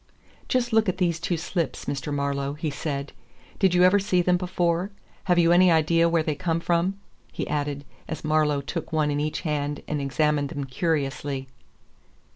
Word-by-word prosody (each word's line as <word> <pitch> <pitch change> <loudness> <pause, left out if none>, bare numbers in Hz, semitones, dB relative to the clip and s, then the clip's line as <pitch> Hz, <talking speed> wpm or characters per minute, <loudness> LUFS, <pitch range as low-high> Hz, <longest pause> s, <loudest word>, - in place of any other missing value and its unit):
"Just 245 -2 0
look 220 -2 +4
at 185 - -2
these 170 -3 +1
two 170 +1 -1
slips, 170 0 -3
Mr. 140 +1 -3
Marlowe," 140 -1 -1
he 150 +1 -3
said. 140 -1 -4 0.5
"Did 190 -3 +3
you 180 - +5
ever 185 +3 +6
see 190 -3 +1
them 180 0 +3
before? 175 0 0 0.4
Have 180 -2 +3
you 170 -1 +5
any 180 +1 +6
idea 165 +1 +3
where 165 -1 +2
they 155 - -1
come 165 +2 -1
from?" 175 +3 0 0.3
he - - -4
added, 145 -1 -2 0.2
as 160 - -5
Marlowe 155 -2 +2
took 160 +4 -5
one 155 -2 +1
in 145 - -1
each 150 +1 -2
hand 145 -3 -2
and 150 -1 -2
examined 145 +1 +1
them 145 -4 -4
curiously. 140 -1 -2
160 Hz, 180 wpm, -25 LUFS, 145-175 Hz, 0.5 s, ever